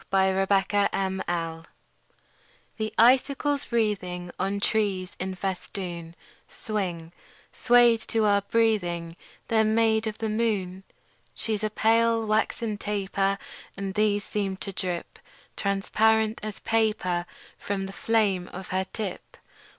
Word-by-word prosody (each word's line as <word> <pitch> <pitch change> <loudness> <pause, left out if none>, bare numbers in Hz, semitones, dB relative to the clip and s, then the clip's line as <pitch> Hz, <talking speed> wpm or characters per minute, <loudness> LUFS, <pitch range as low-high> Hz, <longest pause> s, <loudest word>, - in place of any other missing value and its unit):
SILVER 190 0 +3
FILIGREE 190 -4 0 1.2
The 215 0 -2
icicles 275 +4 +3
wreathing 185 -6 -1
On 195 +2 0
trees 200 -4 0
in 185 +1 -3
festoon 180 -3 -5 0.3
Swing, 180 -6 -4 0.4
swayed 240 -2 +5
to 225 -1 +1
our 200 -1 +4
breathing: 185 -7 0 0.3
They're 220 -1 +3
made 220 0 +2
of 215 0 -4
the 225 - -2
moon. 210 -4 -1 0.5
She's 215 -2 -2
a 215 - +1
pale, 225 +1 +2
waxen 215 0 0
taper; 195 -1 0 0.4
And 195 -1 -3
these 205 0 +2
seem 195 -3 -2
to 195 - -5
drip 180 -2 -4 0.4
Transparent 215 +2 +2
as 215 -1 -6
paper 210 -6 0 0.3
From 195 -1 -2
the 195 - -7
flame 200 -6 +1
of 190 0 -9
her 190 0 0
tip. 205 -5 -6
200 Hz, 115 wpm, -26 LUFS, 190-220 Hz, 1.2 s, swayed